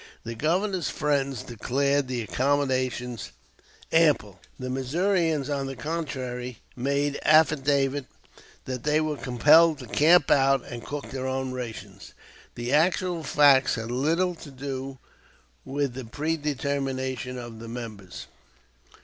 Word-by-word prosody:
The 115 - -5
Governor's 175 - 0
friends 140 -4 -1
declared 140 +4 0
the 125 -2 -2
accommodations 130 - -1 0.6
ample; 150 - +3 0.2
the 130 - -5
Missourians 155 +3 0
on 140 -2 -2
the 135 - -5
contrary 130 -7 -4 0.2
made 140 +3 0
affidavit 145 -3 +3 0.6
that 130 -2 -4
they 150 +3 +2
were 155 -1 -1
compelled 150 +6 +5
to 130 - -9
camp 155 +6 +4
out 135 -1 +4
and 120 -1 -7
cook 145 0 -6
their 130 -1 -3
own 130 0 -2
rations. 125 -3 -8 0.4
The 120 +2 -3
actual 175 +2 +2
facts 140 -2 +4
had 115 0 -5
little 165 +8 +1
to 160 -3 -11
do 135 0 -6 0.7
with 140 -1 -2
the 130 0 -7
predetermination 135 -3 -2
of 120 -2 -8
the 115 - -9
members. 105 -6 -8
135 Hz, 125 wpm, -26 LUFS, 125-150 Hz, 0.7 s, compelled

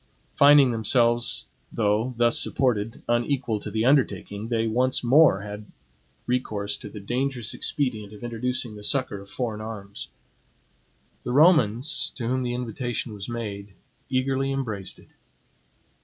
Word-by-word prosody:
Finding 140 -2 +6
themselves, 120 +1 +2 0.3
though 110 +3 0
thus 120 0 +3
supported, 115 -3 -1
unequal 120 -1 0
to 105 - -7
the 110 +2 -1
undertaking, 110 -6 +1
they 115 -1 0
once 125 +4 +1
more 130 -4 +5
had 105 0 -8 0.6
recourse 110 -5 -1
to 105 - -9
the 105 - -9
dangerous 125 +2 -2
expedient 110 -8 -2
of 105 +2 -12
introducing 120 0 -3
the 105 - -10
succor 130 -2 0
of 100 0 -13
foreign 115 -4 -3
arms. 105 -2 -7 1.2
The 125 - -3
Romans, 135 - +3
to 120 -3 -4
whom 130 +1 0
the 120 -1 -2
invitation 120 -1 -4
was 100 +2 -7
made, 100 -4 -6 0.3
eagerly 135 +1 0
embraced 110 -9 -3
it. - - -19
120 Hz, 135 wpm, -25 LUFS, 105-130 Hz, 1.2 s, Finding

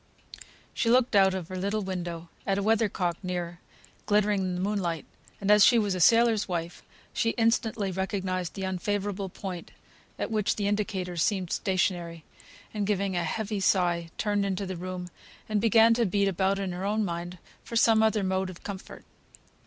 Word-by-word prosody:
She 230 - 0
looked 245 -2 +3
out 190 -1 +5
of 180 -3 -5
their 185 - -6
little 200 +3 -1
window 175 -3 -5 0.2
at 195 -1 +1
a 200 - -1
weather 220 0 +2
cock, 175 -3 -2
near, 175 -2 -4 0.5
glittering 210 -1 +2
in 185 -1 -2
the - - -3
moonlight; 185 -4 -1 0.3
and 200 +1 +1
as 210 -1 +7
she 240 - +6
was 205 -3 +1
a 185 - -3
sailor's 230 +2 +4
wife, 170 -2 -4 0.3
she 230 - 0
instantly 225 -3 +1
recognised 185 -1 -2
the 195 - -5
unfavourable 195 +1 -2
point 180 -2 -7 0.5
at - - -3
which 215 -2 +1
the 205 - -2
indicator 200 -4 -2
seemed 185 +1 0
stationary, 175 -3 -1 0.5
and 205 -2 -2
giving 200 -2 0
a 175 - 0
heavy 215 +2 -2
sigh, 175 -3 +1
turned 205 -1 0
into 195 0 -2
the 185 0 -4
room, 180 0 -5 0.4
and 215 -1 0
began 225 +1 +6
to 230 -1 +1
beat 200 +2 +1
about 195 +1 +1
in 195 -2 -3
her 180 +1 -5
own 210 +2 0
mind 175 0 -5 0.3
for 230 - -8
some 225 -1 +5
other 220 -2 +2
mode 190 0 0
of 180 - -11
comfort. 195 -2 -8
195 Hz, 180 wpm, -28 LUFS, 180-210 Hz, 0.5 s, as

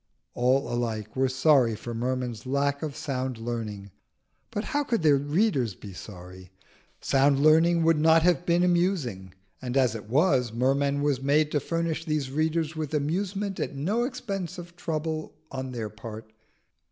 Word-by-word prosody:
All 130 +3 +2
alike 110 -3 -3
were 130 0 +2
sorry 130 -3 +3
for 120 +2 -7
Merman's 125 -1 -3
lack 140 +1 0
of 155 -3 -4
sound 130 -5 -3
learning, 110 -4 -5 0.6
but 210 -1 -3
how 290 +2 -1
could 230 - -1
their 150 -2 +6
readers 145 - +1
be 100 +1 -10
sorry? 90 -1 -11 0.5
Sound 135 0 +3
learning 165 +3 +5
would 165 -1 +3
not 160 +1 +5
have 175 -3 +3
been 175 0 +2
amusing; 170 - 0 0.3
and 125 +1 -2
as 130 -4 +3
it 105 -2 -8
was, 130 -3 +3
Merman 140 +4 +1
was 140 -3 +1
made 150 +2 +2
to 145 - +2
furnish 165 +1 -2
these 150 -4 -1
readers 155 +2 0
with 155 -1 -3
amusement 195 +6 -2
at - - -3
no 200 +12 0
expense 200 - -4
of 175 -1 -10
trouble 160 -2 -3 0.2
on 130 -1 -5
their 115 -3 -4
part. 110 +1 -9
140 Hz, 160 wpm, -27 LUFS, 120-165 Hz, 0.6 s, their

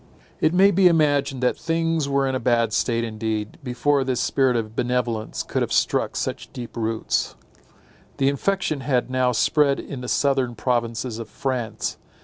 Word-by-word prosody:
It 155 - +3
may 190 +3 +5
be 190 0 +5
imagined 145 -5 +2
that 125 - +1
things 165 -2 0
were 140 0 +2
in 135 - -1
a 130 - 0
bad 115 -3 +1
state 115 -1 +1
indeed, 110 -1 -3
before 135 +2 +1
this 130 -2 -1
spirit 130 -1 +2
of 110 -1 -3
benevolence 120 -3 -1
could - - -2
have - - -1
struck - - +1
such - - -4
deep 120 -3 -8
roots. 115 -1 -1 0.8
The 135 - +2
infection 155 +2 0
had 130 -2 0
now 130 -1 +2
spread 140 +4 +2
in 135 -3 -7
the 125 - -6
southern 135 -3 +1
provinces 115 0 -1
of 115 -2 -7
France. 130 -4 -3
130 Hz, 165 wpm, -23 LUFS, 115-140 Hz, 0.8 s, may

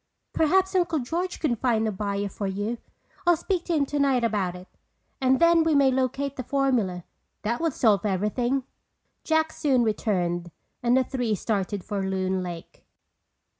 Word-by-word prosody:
"Perhaps 380 +5 +2
Uncle 345 -3 +1
George 335 +8 -3
can 280 -7 +1
find 225 -2 +1
a - - 0
buyer 200 0 -2
for 200 0 -4
you. 205 +5 -3 0.5
I'll 345 -1 +6
speak 350 +1 -2
to 345 - -1
him 290 -2 +2
tonight 275 -3 +1
about 200 -6 0
it. 180 +1 -11 0.5
And 260 0 +3
then 335 -1 +5
we 320 -2 +2
may 275 -2 +5
locate 265 +2 -1
the 255 - -3
formula. 240 -10 0 0.4
That 235 +5 -1
would 330 -3 0
solve 210 -8 +3
everything." 215 +7 0 0.6
Jack 315 0 +1
soon 260 -5 +2
returned 180 -6 -1 0.3
and 245 +1 +3
the 260 - +4
three 245 -4 -1
started 200 -1 -2
for 205 -1 -3
Loon 190 -1 -1
Lake. 175 -2 -8
240 Hz, 165 wpm, -26 LUFS, 200-280 Hz, 0.6 s, I'll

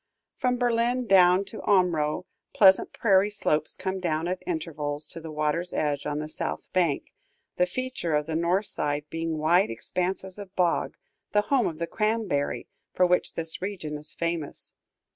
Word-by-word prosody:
From 250 -1 +1
Berlin 245 +1 +1
down 185 -1 +5
to 215 +2 -8
Omro, 180 -4 +2 0.3
pleasant 190 -2 +6
prairie 200 -2 +3
slopes 155 -7 0
come 190 0 -3
down 165 -2 -1
at 185 +1 -2
intervals 150 - -3
to 165 - -8
the 160 - -7
water's 155 +3 -1
edge, 145 -2 -1
on 150 0 -2
the 155 0 -3
south 155 - -4
bank; 170 -6 +1 0.4
the 180 - +3
feature 255 -6 -2
of 150 0 +1
the 160 0 -3
north 175 +5 +1
side 145 -3 -2
being 165 -1 -2
wide 170 +5 +3
expanses 185 - -3
of 200 -2 -10
bog, 175 -2 +1 0.4
the 210 - +5
home 255 -5 +4
of 160 - -4
the 170 - -1
cranberry, 215 -8 -1 0.3
for 180 - +5
which 180 0 +1
this 165 0 -4
region 185 -6 -4
is 150 +1 -9
famous. 165 -3 -3
175 Hz, 165 wpm, -27 LUFS, 155-195 Hz, 0.4 s, pleasant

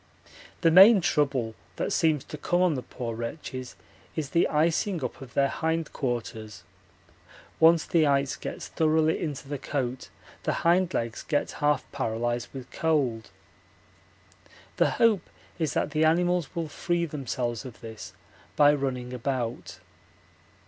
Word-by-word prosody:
The 165 - +4
main 195 +5 +9
trouble 140 -9 0 0.2
that - - -2
seems 155 -4 +2
to - - -8
come 175 +4 +1
on 180 -3 +3
the 130 - -3
poor 120 -1 -6
wretches 125 +2 -6 0.4
is 150 -4 -3
the 170 - +3
icing 165 +2 +1
up 125 - -5
of 130 -2 -11
their 140 0 +4
hindquarters; 120 - -3 1.0
once 165 0 +6
the 160 -3 +3
ice 140 -1 +1
gets - - -6
thoroughly 160 0 +2
into 145 -3 -4
the 145 -1 -4
coat 130 -2 -3 0.3
the - - -1
hind 180 +1 +3
legs 115 -1 -2
get 145 -2 -1
half 145 -2 0
paralysed 120 +2 -2
with 130 -2 -9
cold. 135 -9 0 1.5
The - - +4
hope 220 -6 +3 0.3
is 155 -6 0
that - - 0
the 155 +1 +1
animals 175 0 +2
will 165 -2 -2
free 170 +3 -1
themselves 125 -6 -3
of 130 -3 -10
this 110 -1 -9 0.4
by 145 0 +6
running 130 -3 -3
about. 125 -2 -3
145 Hz, 140 wpm, -27 LUFS, 125-160 Hz, 1.5 s, main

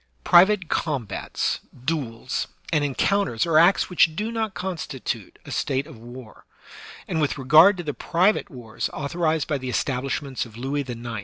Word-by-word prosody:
Private 185 +1 +5
combats, 130 - -2 0.3
duels, 130 -5 -2 0.3
and 150 -2 +2
encounters 145 - +1
are 160 -2 +4
acts 175 +4 +4
which 165 -3 +3
do 215 +5 -2
not 220 -3 -2
constitute 165 -8 -5
a - - -9
state 135 0 -1
of 150 -7 -13
war; 120 0 -12 0.6
and 160 - -1
with 150 - 0
regard 155 +9 +6
to 175 - -5
the 150 -2 -3
private 180 +8 +1
wars 120 -5 -5
authorized 155 +1 -1
by 145 -3 -1
the 130 0 -5
Establishments 135 +1 -2
of 115 -2 -12
Louis 135 +4 -2
IX. 120 0 -6
150 Hz, 155 wpm, -24 LUFS, 130-175 Hz, 0.6 s, regard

